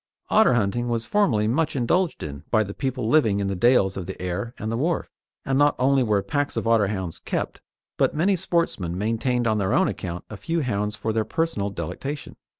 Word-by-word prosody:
Otter 125 - +5
hunting 120 +2 0
was 115 -1 -1
formerly 110 - +2
much 150 +8 0
indulged 165 +8 +1
in 70 -1 -7
by 110 -2 +3
the 100 -1 -7
people 130 -3 -2
living 115 -8 +3
in 100 - -1
the 100 - -1
dales 95 -2 +3
of 95 -3 -5
the 95 - -7
Aire 90 +7 -3
and 110 - -4
the - - -1
Wharfe, 165 +6 -1 0.3
and 135 0 +1
not 145 0 +4
only 135 +1 +3
were 105 -5 +1
packs 145 -1 -1
of - - -1
Otterhounds 100 -6 +1
kept, - - -3 0.4
but - - +2
many 190 +6 +3
sportsmen 165 - -1
maintained 115 +4 0
on 110 -2 +2
their 95 -2 0
own - - +4
account 90 -1 -5
a 110 - -8
few 165 - -1
hounds 105 -4 -1
for 110 +1 -2
their 110 0 +1
personal 110 -5 -1
delectation. 120 - -5
115 Hz, 205 wpm, -24 LUFS, 100-140 Hz, 0.4 s, Otter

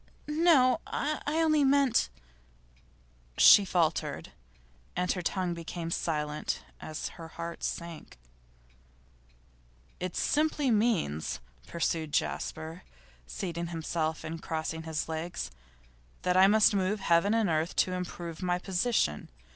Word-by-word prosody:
'No. 300 -5 +4
I 300 +1 -2
only 310 -1 +3
meant 275 - +3 0.6
' - - -32
She 205 - +10
faltered, 170 -4 -1 0.6
and 180 +1 0
her 180 - -2
tongue 180 0 -1
became 170 0 -5
silent 150 -3 -2 0.2
as 155 0 -5
her 165 - -10
heart 170 +1 -7
sank. 170 -2 -5 1.8
'It 180 -1 -4
simply 295 -3 +1
means,' 205 - +1 0.3
pursued 160 -2 -2
Jasper, 160 +2 -2 0.5
seating 170 - -4
himself 160 -1 -2
and 160 +1 -6
crossing 160 0 -3
his 160 -1 -3
legs, 160 - -4 0.7
'that 180 0 +1
I 190 +1 +7
must 215 +1 +5
move 200 +1 0
heaven 180 +5 +3
and 225 -2 +2
earth 160 0 0
to 185 - +2
improve 175 -2 -5
my 180 -1 +1
position. 185 - 0
170 Hz, 115 wpm, -30 LUFS, 160-205 Hz, 1.8 s, She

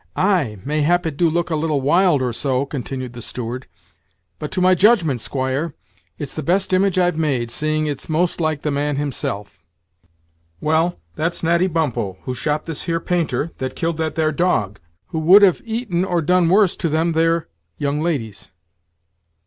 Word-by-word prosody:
"Ay, 175 - +1
mayhap 155 +5 +1
it 160 -3 -2
do 170 +2 +3
look 170 +2 -1
a - - +1
little 155 -2 0
wild 150 +1 +3
or 125 -2 -1
so," 130 +2 0
continued 130 -2 -5
the 120 - -8
steward; 125 +2 -5 0.7
"but 150 - -4
to 185 - -2
my 185 0 +5
judgment, 180 - +3
squire, 135 +5 -2 0.4
it's 145 -3 -6
the 155 - -4
best 185 +5 0
image 185 0 +2
I've 175 -3 +2
made, 130 -7 0
seeing 155 +3 -1
it's 145 0 -4
most 170 +2 0
like 155 -2 -1
the 150 - 0
man 145 +1 -1
himself; 105 - -4 1.0
well, 160 - +1 0.2
that's 165 +3 -2
Natty 170 +2 +3
Bumppo, 145 - -1
who 130 - -3
shot 150 +4 -2
this 165 -3 -4
here 165 -1 0
painter, 165 -4 -1
that 130 0 -4
killed 165 -1 -1
that 160 -1 -2
there 155 -1 +1
dog, 120 - 0 0.3
who 160 - -2
would 185 +6 +7
have 185 -4 +4
eaten 220 -6 -1
or 175 -3 0
done 180 +1 +3
worse 195 0 +4
to 165 - -1
them 160 +2 +1
here 165 0 +1 0.3
young 145 +1 -1
ladies." 135 - -3
155 Hz, 175 wpm, -20 LUFS, 140-175 Hz, 1.0 s, would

